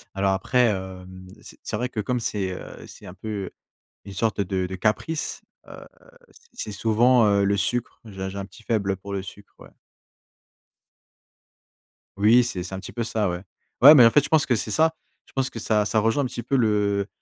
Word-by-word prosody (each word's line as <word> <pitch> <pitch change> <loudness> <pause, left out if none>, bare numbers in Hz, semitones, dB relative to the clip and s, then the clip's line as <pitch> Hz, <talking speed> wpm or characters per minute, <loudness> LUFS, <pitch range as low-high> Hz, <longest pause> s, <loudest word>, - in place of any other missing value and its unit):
Alors 95 0 +1
après, 125 +6 +2
hem, 95 -2 -6
c'est - - -14
c'est - - -3
vrai 125 +3 -2
que 115 -4 -4
comme 125 +4 -2
c'est 100 -4 -2
heu, 90 - -9
c'est - - -13
un 90 - -9
peu, 100 -1 -5 0.6
une 100 - -9
sorte 110 +1 -1
de 95 -1 -2
de 95 - -6
caprice, 110 - -2 0.3
heu, - - -12 0.7
c'est 105 - -6
souvent, 115 +3 +3
heu, 100 -1 +3
le 100 0 +2
sucre. 120 +4 -2
J'ai 95 -2 -6
j'ai 100 - -8
un 100 - -4
petit 105 +4 -17
faible, 105 -4 0
heu, 95 - -1
pour 100 +1 -8
le 95 - -2
sucre, 100 +1 -13
ouais. - - -15 2.5
Oui, 115 +4 +5
c'est 95 -7 -4
c'est 95 +1 -6
un 95 - -5
petit 95 - -9
peu 120 - -3
ça, 110 -4 -1
ouais. 90 0 -4 0.4
Ouais, 145 +4 +10
mais 125 -4 +8
en - - +8
fait, 145 +4 +3
je - - -3
pense 155 -1 +3
que 125 - +1
c'est 110 - -3
ça. 160 +7 +2 0.3
Je - - -23
pense 135 0 0
que 115 - -8
ça 105 -1 +1
ça 110 +1 +1
rejoint 115 +6 +1
un - - -1
petit 120 -2 -5
peu 135 +2 0
le 105 -3 +1
105 Hz, 215 wpm, -24 LUFS, 95-120 Hz, 2.5 s, Ouais